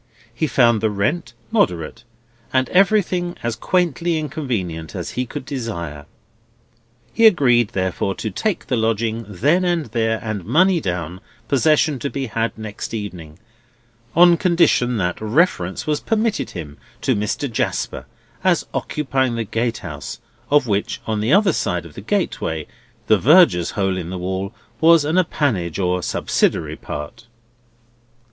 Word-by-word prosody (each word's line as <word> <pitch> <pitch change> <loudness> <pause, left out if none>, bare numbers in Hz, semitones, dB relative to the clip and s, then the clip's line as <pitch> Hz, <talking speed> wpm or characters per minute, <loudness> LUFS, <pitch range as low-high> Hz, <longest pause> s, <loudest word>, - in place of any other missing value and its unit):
He 155 +7 -1
found 120 -6 +3
the 110 - +2
rent 110 +6 -1 0.2
moderate, 115 - 0 0.5
and 130 0 +2
everything 180 -2 +2
as 120 -1 -1
quaintly 170 +3 0
inconvenient 115 - -4
as - - -4
he 125 0 -3
could 130 - -7
desire. 85 - -5 1.1
He 225 - +6
agreed, 125 - +3
therefore, 95 +1 -1
to 110 - -4
take 200 - -2
the 125 - 0
lodging 115 0 -1
then 150 - +2
and 175 -3 0
there, 115 -1 0
and 110 -4 -3
money 180 - +3
down, 90 - -4 0.3
possession 150 +1 +2
to 140 - -3
be 135 -1 -3
had 115 -1 -2
next 110 +1 -6
evening, 90 -8 -7 0.8
on 175 0 +7
condition 170 - +2
that 90 -2 -2
reference 110 - +1
was 150 -1 0
permitted 225 -1 0
him 75 -5 -8 0.2
to 130 - +1
Mr. 105 +7 -1
Jasper 115 - -2 0.4
as - - +2
occupying 130 -4 -1
the 115 - -1
gatehouse, 105 -10 -4 0.3
of 145 -1 +4
which 105 -3 -1
on 110 -1 -1
the 110 +5 0
other 195 0 +5
side - - -1
of - - -12
the - - -9
gateway, 80 -1 -2 0.4
the 110 -2 +4
Verger's 145 - +5
hole 95 -2 +1
in 85 -2 -5
the 95 - -4
wall 95 +2 -3 0.3
was 165 -2 +6
an 160 +5 +2
appanage 110 - 0
or 90 -1 0
subsidiary - - 0
part. 75 +10 -8
115 Hz, 145 wpm, -20 LUFS, 95-155 Hz, 1.1 s, on